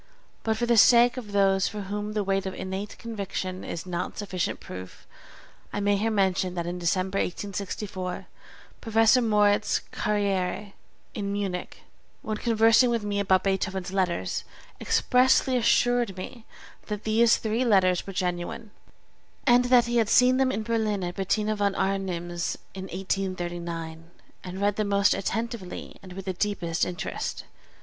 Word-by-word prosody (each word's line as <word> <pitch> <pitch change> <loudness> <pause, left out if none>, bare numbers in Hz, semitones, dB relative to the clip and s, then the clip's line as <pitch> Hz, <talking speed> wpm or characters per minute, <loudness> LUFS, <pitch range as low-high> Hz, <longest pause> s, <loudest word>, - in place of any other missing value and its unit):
But 220 -1 0
for 240 - 0
the 235 -1 +3
sake 240 +3 +7
of 235 -5 -7
those 195 -1 +3
for 210 -1 -5
whom 205 +2 -4
the 210 -1 0
weight 195 0 0
of 190 - -5
innate 190 +2 -5
conviction 195 -4 -5
is 170 - -5
not 180 -1 -4
sufficient 185 -4 -2
proof, 95 0 -10 0.7
I - - -3
may 205 0 +2
here 215 +3 0
mention 190 -3 +1
that 170 -1 -2
in 175 +1 -4
December, 185 +3 0
1864, 190 -1 -4 0.6
Professor 225 +2 +4
Moritz 210 -2 +2
Carrière, 200 -1 -1 0.4
in 200 -2 -3
Munich, 195 -3 -4 0.4
when 215 -4 -3
conversing 230 +2 +4
with 230 -2 0
me 205 -1 -1
about 190 -2 +3
Beethoven's 190 -1 -1
Letters, 175 - -1 0.4
expressly 255 +1 +3
assured 240 -3 +2
me 220 +5 -8 0.4
that 210 -1 -4
these 225 +2 +4
three 225 +3 -1
letters 190 -6 +3
were - - -4
genuine, 180 +4 -3 0.7
and 245 -1 +5
that 245 -1 +5
he 240 0 0
had 225 -2 +2
seen 250 +1 +5
them 265 -1 +2
in 220 - -2
Berlin 215 -3 0
at 175 0 -3
Bettina 210 +3 0
v. 205 -1 0
Arnim's 175 -3 -2 0.2
in 190 -1 -6
1839, 175 -3 -4 0.3
and 185 +1 -6
read 205 0 +1
them 215 -1 0
most 200 0 +3
attentively 220 -1 -4
and 185 -1 -11
with 195 +1 -8
the 190 - -2
deepest 180 -4 -1
interest. 175 -2 -4
200 Hz, 150 wpm, -26 LUFS, 185-220 Hz, 0.7 s, sake